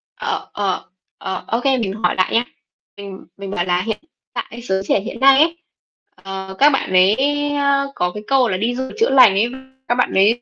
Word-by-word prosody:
Ờ, - - -4
ờ. 195 -2 -2 0.3
Ờ, 190 -1 -5
ô 230 - 0
kê, 270 -1 +2
mình 200 -5 -2
hỏi - - +2
lại 185 - 0
nhá. 230 - +3 0.5
Mình 200 -1 -10
mình 195 -1 -7
bảo 175 -3 -1
là 180 0 +1
hiện 220 +1 -3 0.3
tại 235 -1 -6
giới 190 -4 -1
trẻ - - +2
hiện 230 +3 -7
nay 270 +2 +6
ấy, 330 +1 +2 0.6
ờ, 190 0 -8
các 290 - +7
bạn 270 - -1
ấy, 185 +3 +5 0.4
ơ, 280 -1 +1
có 180 0 -1
cái 210 0 -7
câu 265 -2 +3
là 185 - -1
"Đi 230 +5 -1
du 260 - -3
lịch - - -12
chữa 455 - +3
lành 255 -6 +7
ấy", 220 +5 +1 0.4
các 240 - +1
bạn 250 - 0
ấy 215 +5 +3
220 Hz, 220 wpm, -19 LUFS, 190-260 Hz, 0.6 s, các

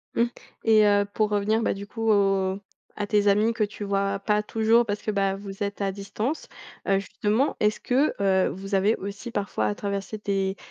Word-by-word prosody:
Mmh, 235 - +4 0.4
et 215 -1 +6
heu, 205 0 +4
pour 215 -1 +1
revenir, 210 +2 +1
bah, - - +1
du 200 +1 -8
coup 225 +1 -2
au 195 -2 +2 0.4
à 205 - -2
tes 205 -1 +2
amis 210 +3 +3
que 225 -2 0
tu 205 0 -4
vois 200 0 0
pas 210 +1 +1
toujours, 225 +2 +3
parce 205 -2 -3
que, 215 - -2
bah 195 -1 +1
vous 195 0 -6
êtes 200 0 -4
à 195 -1 -1
distance, 210 +9 -4 0.4
heu, 195 0 +4
justement, 210 +6 0
est-ce 210 0 +2
que, 270 +5 +1
heu, 190 -1 +3
vous 195 +2 -4
avez 200 +4 +3
aussi 200 +5 -7
parfois 200 - -1
à 105 - -1
traverser 200 +1 -4
des 195 -1 0
205 Hz, 200 wpm, -25 LUFS, 195-215 Hz, 0.4 s, et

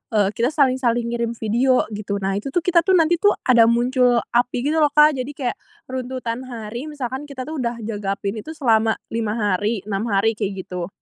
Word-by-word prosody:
eee, 205 -2 +3
kita 230 +3 0
saling-saling 260 -5 +1
ngirim 235 0 -2
video 240 +4 +2
gitu, 205 -1 -4
nah 195 - 0
itu 210 - -7
tuh, 325 +5 -1
kita 355 -1 +4
tuh, 375 +3 +2
nanti 335 0 +3
tuh 410 +2 +4
ada 235 -3 +5
muncul 245 +1 +3 0.2
api 245 0 +1
gitu 305 +3 +1
loh, 300 - +5
Kak. 300 0 +7
Jadi 255 +3 -4
kayak 250 -4 -3 0.3
runtutan 255 -2 -4
hari, 235 +2 -6
misalkan 275 -1 -5
kita 270 -3 -6
tuh 310 +3 -6
udah 235 -2 -3
jaga 205 -2 -3
api 200 0 -3
ini 220 - -6
itu 315 - -6
selama 225 -6 +2 0.2
5 220 -2 -1
hari, 205 0 0
6 205 +2 -3
hari, 205 +1 +2
kayak 195 -3 -3
gitu. 180 -1 -5
240 Hz, 205 wpm, -21 LUFS, 215-265 Hz, 0.3 s, Kak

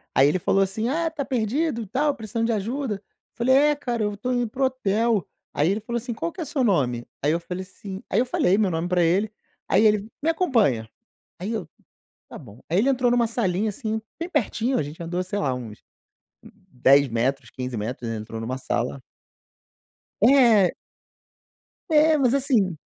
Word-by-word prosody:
aí 135 +1 +6
ele 180 +5 +1
falou 195 +3 +2
assim: 210 +4 -2
"Ah, 330 +3 0
está 310 -3 -3
perdido 255 +2 -1
e 215 - -7
tal, 285 +6 0
precisando 225 0 -2
de 230 - +1
ajuda?" 230 +3 -2
Eu 195 - -11 0.3
falei: 255 +3 +3
"É, 295 +2 +4
cara, 240 -6 -2
eu 210 - -1
estou 245 +5 -3
indo 245 -1 0
para 265 - -7
o - - +6
hotel". 230 -4 0 0.3
Aí, 150 +3 +2
ele 210 +2 -1
falou 235 +2 -3
assim: 240 +1 -4
"Qual 335 +9 -3
que 360 - -14
é - - -3
seu 280 -2 -1
nome?" 125 - +1 0.2
Aí, 150 - +3
eu 170 - +1
falei, 180 +2 -6
assim 190 +1 -9
aí 205 - +2
eu 250 - +2
falei 195 -6 +2
meu 210 -3 +2
nome 165 +2 -1
para 180 -1 +2
ele, 195 +6 +2 0.4
aí 220 - +4
ele: 210 -1 +3
"Me 315 - +1
acompanha". 225 - +1 0.5
Aí 200 +6 -4
eu: 190 -8 -4 0.6
"Tá - - -8
bom." 115 -4 -14
Aí 170 - +1
ele 250 +7 +3
entrou 250 -2 +2
em - - +3
uma 235 -1 +3
salinha, 215 -3 0
assim, 220 0 -3 0.2
bem 335 +2 -4
pertinho, 245 - 0
a - - 0
gente 150 +4 -9
andou, 175 +2 -2
sei 185 +3 -4
lá, 135 -3 0
uns 115 -4 -8 0.6
10 135 +3 +2
metros, 125 +4 -1
15 125 -1 -5
metros, 120 +3 -4
ele 115 - -3
entrou 110 +1 -7
em - - -5
uma 130 +3 -3
sala 130 +1 -2 1.2
É. 230 -6 +6 1.2
É, 310 +1 +5
mas 265 -3 +2
assim 235 - +1
215 Hz, 205 wpm, -24 LUFS, 165-250 Hz, 1.2 s, aí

